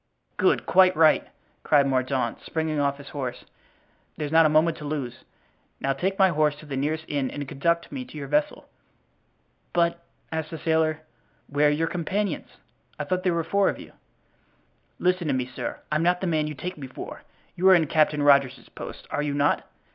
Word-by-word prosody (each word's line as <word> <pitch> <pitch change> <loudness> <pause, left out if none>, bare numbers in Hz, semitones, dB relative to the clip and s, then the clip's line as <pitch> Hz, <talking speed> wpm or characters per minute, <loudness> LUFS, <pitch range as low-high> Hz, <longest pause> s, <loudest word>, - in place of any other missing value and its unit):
"Good, - - +2
quite 185 -1 +5
right!" 160 -1 +5 0.3
cried 145 -2 +4
Mordaunt, 130 -2 -1
springing 160 -2 -2
off 140 -1 +1
his 140 -1 -11
horse. 130 -4 -5 0.7
"There's 150 -1 -3
not 160 0 +6
a - - 0
moment 155 +2 +3
to - - -9
lose; 140 -5 -5 0.5
now 135 - 0
take 190 +8 -2
my 190 -1 +5
horse 150 -3 +2
to 150 - -14
the 140 -2 -5
nearest 155 +4 -1
inn 140 -3 -1
and 145 -1 -6
conduct 170 +5 0
me 265 - -4
to 155 - -11
your 140 -2 -5
vessel." 150 +2 0 1.1
"But," 170 0 +1 0.3
asked 160 -1 -3
the 165 - -6
sailor, 160 -1 +1 0.4
"where 145 +1 +2
are - - +5
your 150 +2 +1
companions? 185 +5 -2 0.5
I - - -3
thought 185 0 -1
there 180 -2 +1
were 165 - 0
four 200 +4 +2
of - - -4
you." - - -11 1.1
"Listen 180 -2 +1
to 140 - +1
me, 130 -1 -1
sir. 125 0 -6
I'm 155 +1 +1
not 180 +1 +2
the 190 - -3
man 155 -3 +1
you 150 - -5
take 180 +3 -6
me 135 - -6
for; 130 - -8 0.3
you 185 +2 +4
are 190 - +9
in 165 -2 +3
Captain 150 -1 +2
Rogers's 140 -3 +3
post, - - -9
are 145 - -1
you 145 -1 -2
not? 145 0 +1
155 Hz, 195 wpm, -25 LUFS, 145-170 Hz, 1.1 s, are